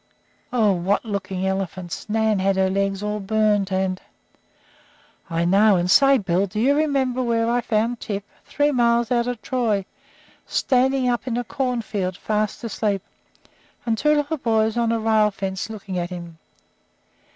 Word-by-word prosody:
Oh, 225 -5 +3
what 190 +4 0
looking 190 -3 -3
elephants! 190 0 -4
Nan 220 -1 +1
had 195 +1 +1
her 190 0 +2
legs 195 0 -1
all 210 0 -2
burned, 210 -1 +1
and 190 0 -1 0.7
" - - -31
"I 165 0 0
know, 200 +3 +5
and 180 0 +1
say, 275 +2 +6
Bill, 190 -2 0
do 205 +3 -5
you 265 +5 +4
remember 270 -4 +1
where 230 -2 +1
I 240 +1 +1
found 230 +1 0
Tip? 200 -1 -4 0.2
Three 290 0 0
miles 235 -2 +2
out 240 -1 +2
of 245 -2 -3
Troy, 220 -6 0 0.6
standing 260 0 +1
up 240 -1 -1
in 240 -2 -1
a 245 - -1
corn 250 -1 -2
field 185 -4 -3
sound 215 -1 +1
asleep, 210 -3 -1 0.8
and 230 -2 +1
two 300 +7 +2
little 295 +2 -1
boys 220 -4 +1
on 235 -1 +1
a 230 - 0
rail 220 -1 +3
fence 195 0 -4
looking 195 -4 -5
at 175 0 -3
him. 170 -2 -8
215 Hz, 165 wpm, -22 LUFS, 195-240 Hz, 0.8 s, say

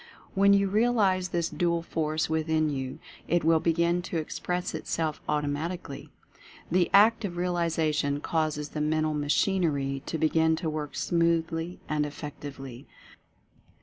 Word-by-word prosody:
When 200 +1 +5
you 200 0 +4
realize 200 -4 +2
this 170 -1 0
dual 170 -1 0
force 155 -1 -1
within 160 -1 +1
you, 130 -1 -4 0.3
it 175 +1 +2
will 160 0 +4
begin 170 +2 +1
to 170 - -2
express 180 +3 -3
itself 155 -2 -2
automatically. 150 +1 -3 0.6
The 180 0 +3
act 220 +3 +5
of 175 -4 -4
realization 160 -5 0
causes 150 -2 -1
the 150 - -4
mental 155 0 +1
machinery 145 -2 0
to 160 - -2
begin 160 +1 +3
to 160 -1 -3
work 150 -3 -5
smoothly 165 +3 0
and 150 -1 0
effectively. 140 -3 -8
160 Hz, 130 wpm, -28 LUFS, 150-175 Hz, 0.6 s, When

